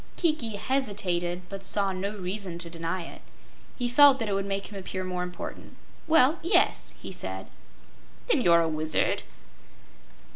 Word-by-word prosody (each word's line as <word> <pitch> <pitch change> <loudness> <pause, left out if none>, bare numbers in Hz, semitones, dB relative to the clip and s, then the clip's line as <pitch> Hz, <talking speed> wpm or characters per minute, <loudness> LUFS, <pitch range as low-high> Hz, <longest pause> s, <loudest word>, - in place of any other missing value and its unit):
Kiki 305 - 0
hesitated, 195 -8 -1
but 195 0 -8
saw 195 0 +1
no 200 +3 -4
reason 185 -1 -4
to 170 -1 -6
deny 165 +2 -3
it. - - -11 0.5
He 245 - -1
felt 275 +2 +7
that 225 -4 -2
it 205 - -1
would 195 0 -1
make 200 +1 -3
him 200 - -5
appear 185 0 -5
more 180 -1 -3
important. 180 0 -7 0.3
"Well 315 0 +5
yes," 340 +5 +2
he - - -7
said. - - -5 0.8
"Then 385 - +3
you're 170 -6 +5
a 165 - +1
wizard?" 155 -1 +1
195 Hz, 155 wpm, -27 LUFS, 180-240 Hz, 0.8 s, felt